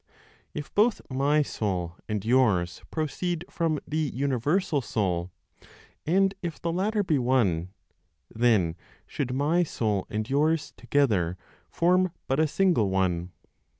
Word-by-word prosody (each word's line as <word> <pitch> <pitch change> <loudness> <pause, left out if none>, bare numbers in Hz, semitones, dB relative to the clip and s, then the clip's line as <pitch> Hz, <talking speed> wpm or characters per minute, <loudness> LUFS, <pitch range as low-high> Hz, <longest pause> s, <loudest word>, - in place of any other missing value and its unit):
If 150 -1 -6
both 215 +1 +3
my 145 +3 +2
soul 90 -9 -3
and 105 -1 -2
yours 110 -8 +2
proceed 170 +2 -2
from 165 -2 0
the 155 +1 -1
universal 140 - 0
(Soul), 90 -7 -1 0.8
and 195 +3 +3
if 170 -4 -5
the 170 - -2
latter 205 +4 +1
be 155 -7 +1
one, 105 -10 +1 0.6
then 110 -8 +2 0.3
should 130 -3 -3
my 150 +6 +2
soul 110 - -1
and 105 0 -2
yours 150 +3 +1
together 100 -12 +1 0.3
form 180 +1 +2
but 135 +2 0
a 155 - +4
single 165 - +2
one. 90 -2 0
135 Hz, 125 wpm, -27 LUFS, 105-165 Hz, 0.8 s, a